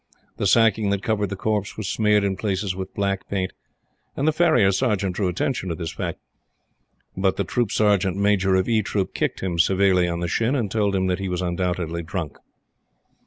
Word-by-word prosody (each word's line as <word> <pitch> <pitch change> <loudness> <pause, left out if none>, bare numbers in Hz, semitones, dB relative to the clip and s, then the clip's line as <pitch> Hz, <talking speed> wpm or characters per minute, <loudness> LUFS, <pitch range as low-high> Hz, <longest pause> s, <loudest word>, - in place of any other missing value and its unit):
The 100 - 0
sacking 110 -1 +3
that 100 0 -1
covered 105 -3 0
the 100 - -4
corpse 105 0 -2
was 110 -3 -4
smeared 105 -1 +2
in 100 -1 0
places 95 -1 -2
with 95 0 -6
black 100 -1 -2
paint; 95 -2 -2 0.6
and 140 - -1
the - - +5
Farrier 150 - +4
Sergeant 100 -4 0
drew 100 -1 0
attention 95 +2 -2
to 85 - -2
this 85 -2 -5
fact. - - -4 1.0
But 95 0 +1
the 100 - +1
Troop 115 +3 -1
Sergeant 100 -3 +2
Major 100 -2 +2
of 95 0 +1
E 115 -2 +2
Troop 95 -2 -2
kicked - - -2
him 90 -3 -2
severely 95 0 +3
on 85 0 -2
the 85 - -2
shin, 115 +9 0
and 110 -8 -1
told 105 -2 +1
him 95 0 +1
that 90 0 0
he 95 -1 -3
was 90 0 -2
undoubtedly 85 -1 -2
drunk. 80 -3 -5
95 Hz, 200 wpm, -23 LUFS, 90-105 Hz, 1.0 s, the